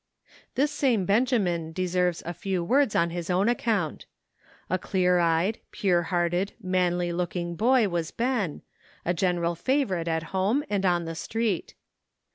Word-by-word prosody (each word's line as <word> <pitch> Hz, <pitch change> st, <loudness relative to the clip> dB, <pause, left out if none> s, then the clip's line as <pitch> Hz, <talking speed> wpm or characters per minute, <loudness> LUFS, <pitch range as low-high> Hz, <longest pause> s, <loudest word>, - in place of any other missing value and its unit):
This 285 Hz, +3 st, +2 dB
same 255 Hz, -9 st, +1 dB
Benjamin 195 Hz, -7 st, +1 dB
deserves 180 Hz, -1 st, 0 dB
a 175 Hz, -, -3 dB
few 180 Hz, +1 st, -2 dB
words 265 Hz, +5 st, +2 dB
on 170 Hz, 0 st, +2 dB
his 175 Hz, 0 st, -5 dB
own 185 Hz, +3 st, +2 dB
account. 220 Hz, -9 st, 0 dB, 0.6 s
A 185 Hz, -, 0 dB
clear 180 Hz, -1 st, +2 dB
eyed, 170 Hz, +5 st, +1 dB
pure 180 Hz, -4 st, +1 dB
hearted, 175 Hz, +2 st, 0 dB
manly 180 Hz, -3 st, 0 dB
looking 175 Hz, 0 st, -2 dB
boy 235 Hz, +4 st, +3 dB
was 170 Hz, -3 st, -2 dB
Ben, 230 Hz, -, -1 dB, 0.4 s
a 175 Hz, -, +1 dB
general 175 Hz, -1 st, 0 dB
favorite 190 Hz, -, 0 dB
at 160 Hz, -1 st, 0 dB
home 200 Hz, +10 st, +1 dB
and 195 Hz, -2 st, +1 dB
on 175 Hz, -1 st, +1 dB
the 165 Hz, -, -4 dB
street. 215 Hz, +3 st, -2 dB
180 Hz, 145 wpm, -26 LUFS, 170-210 Hz, 0.6 s, boy